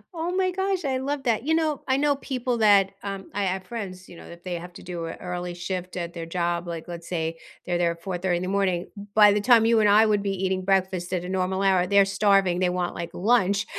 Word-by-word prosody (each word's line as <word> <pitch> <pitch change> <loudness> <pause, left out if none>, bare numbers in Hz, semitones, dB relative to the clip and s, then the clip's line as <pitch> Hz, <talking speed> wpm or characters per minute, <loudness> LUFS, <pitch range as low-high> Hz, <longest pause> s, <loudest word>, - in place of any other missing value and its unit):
Oh 335 +2 -2
my 370 -1 +1
gosh, 380 -2 -1
I 265 -2 0
love 275 +1 -3
that. 230 -3 0
You 320 +3 +1
know, 315 -3 0
I 260 0 +2
know 285 0 +2
people 255 -3 -2
that, 200 -3 +5
um 195 -1 -6
I 205 0 -1
have 190 0 -2
friends, 190 -5 -7
you - - -13
know, - - -12
that 170 0 -12
they 185 - -4
have 175 +1 -7
to - - -12
do 175 -2 -5
a 165 - -5
early 180 -1 -5
shift 180 0 -5
at 170 -1 -4
their 165 -1 -6
job, 175 0 -2
like, 165 -1 -6
let's 170 -1 -8
say 165 -2 -2 0.3
they're 175 -1 -1
there 170 -1 +2
at 170 0 -19
4:30 180 -1 -1
in 175 - -4
the - - -3
morning, 190 -3 0 0.2
by 210 -1 +8
the 205 - 0
time 230 0 +5
you 230 0 +4
and 210 -1 +4
I 215 +2 +6
would 210 -2 +2
be 200 0 -1
eating 185 0 -1
breakfast 185 -2 0
at 180 -1 -1
a - - -6
normal 190 +1 -1
hour, 185 -2 +3
they're 200 0 +5
starving, 195 -2 +2
they 185 -1 +2
want, 180 -1 -2
like, 170 0 -5
lunch, 200 -1 +2
190 Hz, 255 wpm, -25 LUFS, 175-220 Hz, 0.3 s, by